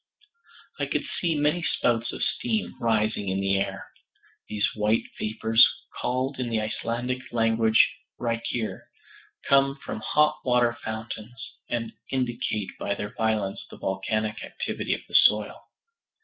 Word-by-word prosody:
I - - 0
could - - 0 0.2
see 170 -3 +1
many 150 +4 +2
spouts 120 -7 +1
of - - -4
steam 225 -3 -1
rising 110 -3 +1
in 95 +1 0
the 95 0 +2
air. 100 0 -3 0.6
These 105 -1 +1
white 110 +1 +2 0.2
vapors, 110 +1 +3 0.3
called 130 +2 -1
in 125 -2 -1
the 115 -1 +1
Icelandic 120 +3 -2
language 115 -1 +4 0.3
"reykir," 115 -1 -2 0.6
come 135 0 +4
from - - -4
hot 150 +7 +3
water 120 -2 +3
fountains, 110 +1 -6 0.2
and 115 -1 -2 0.2
indicate 120 -5 -1
by 100 - -1
their 105 +1 -5
violence 110 -3 0
the - - -11
volcanic 105 +3 -1
activity - - -2
of - - -9
the - - -18
soil. - - +4
115 Hz, 135 wpm, -27 LUFS, 110-125 Hz, 0.6 s, language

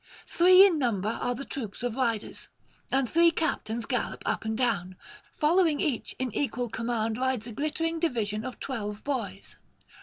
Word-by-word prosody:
Three 370 +2 +7
in 345 -6 +2
number 215 -6 0
are 245 +2 -2
the 275 +3 -6
troops 235 -4 -5
of 245 -2 -2
riders, 230 -5 -2 0.4
and 270 -1 +2
three 335 +6 +5
captains 235 -9 -2
gallop 250 -2 -2
up - - -1
and 220 0 -1
down; 200 -7 0 0.4
following 320 -1 +3
each 275 -8 -1
in 255 -4 -3
equal 245 -3 -1
command 230 -1 -2
rides 260 -4 0
a 240 - -7
glittering 325 +6 -1
division 220 -10 -1
of 255 0 -6
twelve 210 -5 -4
boys. 215 -9 -4
245 Hz, 160 wpm, -28 LUFS, 220-290 Hz, 0.4 s, Three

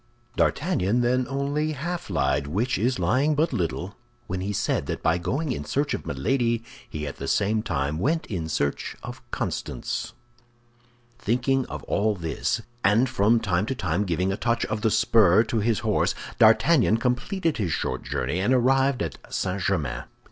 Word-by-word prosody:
D'Artagnan 125 - +1
then 125 +1 +1
only 145 +3 -1
half 170 +3 -4
lied, 70 -4 0
which 105 - 0
is 125 +4 +1
lying 145 +4 +2
but 155 +3 +1
little, 90 +2 -2 0.3
when 95 0 -3
he 100 +2 -2
said 100 - -1
that - - -4
by 80 +2 +2
going 135 - -1
in - - -3
search 145 +1 -1
of - - -5
Milady 115 - 0 0.3
he 75 -1 -5
at 70 - -6
the - - -5
same 110 +2 +1
time 75 -6 -2
went 160 - 0
in 85 -7 -4
search 70 -2 -1
of - - -8
Constance. - - -3 1.1
Thinking 125 +3 +1
of - - -7
all 105 +1 +1
this, 85 +5 -2 0.2
and 105 +7 +4
from 115 -2 +3
time 95 -1 0
to 135 - -2
time 90 -3 0
giving 90 0 0
a 95 - -2
touch 115 -1 0
of 110 - -3
the 110 - +3
spur 105 -2 +5
to 110 0 -1
his 110 +1 +1
horse, 110 -3 +1 0.2
D'Artagnan 115 +1 +5
completed 145 +8 -1
his 95 -7 -1
short - - -2
journey, 70 +8 -2
and 105 +7 +3
arrived 135 0 +3
at 80 -6 -5
St. 95 +1 -2
Germain. - - -1
110 Hz, 170 wpm, -25 LUFS, 90-130 Hz, 1.1 s, spur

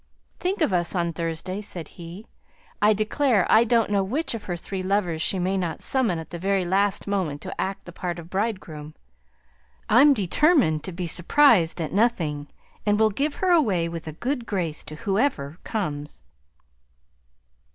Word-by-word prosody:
"Think 370 +1 -2
of 305 - +2
us 175 +1 +3
on 170 -1 0
Thursday," 170 +4 -3
said 175 -6 -4
he. 175 +5 -10 0.6
"I 210 - +5
declare 215 0 +2
I 220 - +7
don't 230 -2 +2
know 200 -1 +2
which 265 +12 -2
of 225 -3 -6
her 175 -2 -3
three 190 +2 -5
lovers 185 -4 0
she 190 - +1
mayn't 185 -2 -2
summon 245 -10 +1
at 160 - -8
the 170 - -6
very 195 0 0
last 195 +2 +1
moment 185 -8 -2
to - - -5
act 195 +1 -4
the 175 - -9
part 175 0 -4
of 170 -1 -9
bridegroom. 180 -7 -4 0.9
I'm 275 +6 +6
determined 205 - +2
to 185 - -4
be 180 +1 -4
surprised 175 - +4
at 160 - -3
nothing; 170 -10 0 0.4
and 210 0 +1
will 220 -1 +4
give 285 +8 -1
her 375 -1 +1
away 205 - +3
with 165 -1 -7
a 155 - -5
good 245 - -3
grace 170 -6 -2
to 155 - -7
whoever 195 - -1
comes." 150 -9 -4
190 Hz, 170 wpm, -24 LUFS, 170-220 Hz, 0.9 s, I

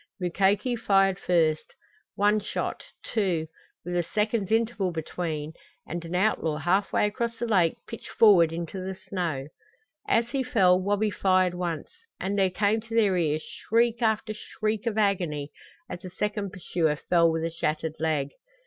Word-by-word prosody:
Mukoki 195 +7 +1
fired 195 -4 +2
first; 160 -3 +1 0.4
one 205 +1 +3
shot, 210 - -4 0.2
two 185 -8 0 0.4
with 175 0 -3
a 175 - +3
second's 210 +3 -1
interval 225 -4 +1
between 160 -2 -4 0.3
and 170 +1 -5
an 170 +1 -5
outlaw 180 -5 +1
half 180 +6 +1
way - - +2
across 230 +3 -2
the 240 - -2
lake 185 -8 +2
pitched 230 - -9
forward 185 -7 +6
into 170 +3 -5
the 190 0 -4
snow. 175 -8 -3 0.6
As 230 +1 +2
he 275 - 0
fell, 190 -8 +3
Wabi 205 +2 +1
fired 185 -2 +2
once, 175 -3 -4 0.3
and 195 +2 -2
there 195 -2 +3
came 205 +4 +1
to 230 0 -7
their 210 -5 +4
ears 155 -3 0
shriek 235 +1 0
after 220 -1 +1
shriek 215 +1 -3
of 220 -2 -1
agony 175 -9 0 0.4
as 175 - -7
a 185 - -6
second 205 +1 -3
pursuer 165 -4 -1
fell 170 +2 +3
with 160 0 -2
a 165 - -1
shattered 160 -1 -2
leg. 150 -3 0
190 Hz, 160 wpm, -27 LUFS, 165-215 Hz, 0.6 s, forward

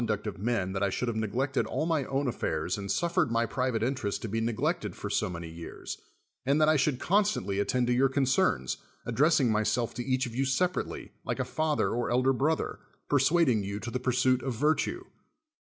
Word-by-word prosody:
luet - - -1
70 110 - +2
SOCRATES 105 0 -6
of - - -8
men 105 -6 0
that 95 - -2
I 100 - +2
should 125 - -2
have 115 - -3
neglected 125 +6 0
all 155 - -1
my 160 -5 +1
own 135 +1 -1
affairs 85 -7 -1
and 100 -1 -4
suffered 170 -4 +1
my 115 0 +2
private 125 -1 -1
interest 120 -5 -2
to - - -2
be 115 +2 -1
neglected 115 -1 -1
for - - -5
so - - +1
many 85 -1 -6
years, 85 +1 -8 0.4
and 140 +4 +2
that 155 - +5
I 155 - +5
should 140 -2 +1
constantly 200 - +1
attend 125 +4 +1
to 120 - +2
3'our 135 +2 +3
concerns, 130 - +1 0.3
addressing 145 -4 +3
myself 110 +2 +1
to 120 - -4
each 130 +1 0
of 120 - -7
you 130 +3 0
separately, 175 +7 -1
like - - -2
a - - 0
father 155 -1 0
or 120 +1 -1
elder 130 +2 +3
brother, 150 +5 0 0.3
persuading 140 -5 +3
you 100 +1 -4
to 120 +2 -6
the 125 - -2
pursuit 130 0 +2
of 130 -2 -3
virtue. 155 - +1
125 Hz, 210 wpm, -29 LUFS, 110-140 Hz, 0.4 s, that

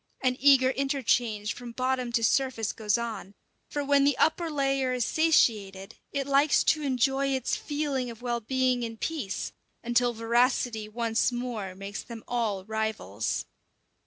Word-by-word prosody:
An 255 -1 +2
eager 265 -1 +6
interchange 240 -6 0
from 240 -1 -9
bottom 255 -1 -1
to 230 - +1
surface 250 -3 +1
goes 210 0 0
on; 225 -4 -5 0.3
for 290 - -2
when 280 0 +3
the 280 -2 +3
upper 330 +1 +2
layer 275 -3 0
is 250 -3 0
satiated, 210 -11 +2 0.2
it 280 -1 -2
likes 280 +2 +3
to 310 - +2
enjoy 270 0 +1
its 265 -2 0
feeling 290 -4 -2
of 230 +1 -10
well 240 -1 -1
being 255 +1 0
in 230 -1 -4
peace, 260 -9 -3 0.3
until 240 +1 +2
voracity 230 -1 +1
once 230 +1 0
more 240 -6 -4
makes 195 +2 -6
them 230 -2 -10
all 215 -6 -1
rivals. 220 - -2
245 Hz, 150 wpm, -28 LUFS, 225-270 Hz, 0.3 s, eager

